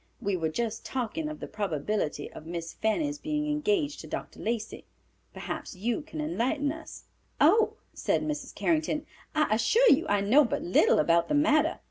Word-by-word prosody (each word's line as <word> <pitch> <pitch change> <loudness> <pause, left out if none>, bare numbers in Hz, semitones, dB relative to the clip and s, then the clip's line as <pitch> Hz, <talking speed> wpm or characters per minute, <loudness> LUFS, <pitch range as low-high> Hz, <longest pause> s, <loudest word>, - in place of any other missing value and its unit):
We 200 -1 -1
were 165 -3 -1
just 225 +6 -3
talking 265 +5 -3
of 305 - -7
the - - -5
probability 190 -5 -2
of 155 - -11
Miss 165 -1 -5
Fanny's 290 +7 -1
being 300 -1 -2
engaged 300 0 0
to - - -10
Dr. - - -6
Lacey. 230 -1 -3 0.5
Perhaps - - -6
you 230 - -1
can 315 +1 -8
enlighten 290 -1 0
us." 320 +1 -9 0.4
"Oh," 435 +8 +5 0.2
said - - 0
Mrs. 300 -1 -4
Carrington, 310 -2 0 0.3
"I 305 -7 +2
assure 440 - +4
you 270 - +3
I 205 0 +2
know 245 +10 +5
but 235 - -2
little 175 - +4
about 170 +2 +3
the - - +1
matter. 310 +2 +3
285 Hz, 170 wpm, -28 LUFS, 205-310 Hz, 0.5 s, Oh